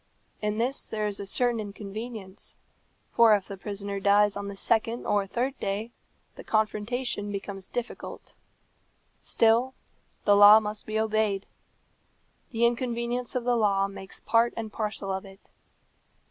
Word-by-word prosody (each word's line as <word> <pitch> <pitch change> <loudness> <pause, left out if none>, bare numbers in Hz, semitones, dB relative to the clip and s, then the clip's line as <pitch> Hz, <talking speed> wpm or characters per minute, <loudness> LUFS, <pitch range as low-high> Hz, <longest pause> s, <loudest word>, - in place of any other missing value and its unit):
In 210 0 -1
this 250 +4 0
there 215 -1 -2
is 205 -1 -1
a 200 - -3
certain 240 +2 +2
inconvenience, 210 0 -6 0.6
for 230 -2 +6
if 200 -2 -3
the 200 - -6
prisoner 200 0 -4
dies 205 +1 +4
on 200 0 -4
the 200 - -6
second 230 +3 0
or 205 -1 +1
third 250 +6 -1
day 205 +4 -3 0.5
the - - -9
confrontation 215 0 -1
becomes 195 -1 -6
difficult; 245 -1 -6 0.9
still 235 +3 +2 0.5
the 205 - +6
law 205 +1 +9
must 210 -1 -5
be 215 0 -1
obeyed. 215 -2 0 1.0
The 235 -1 +1
inconvenience 240 0 -1
of 250 - 0
the 245 0 +2
law 200 -3 +2
makes 195 -1 -9
part 230 +1 +2
and 220 -2 -5
parcel 210 -2 -3
of 190 0 -3
it. 195 0 -16
215 Hz, 145 wpm, -27 LUFS, 200-235 Hz, 1.0 s, law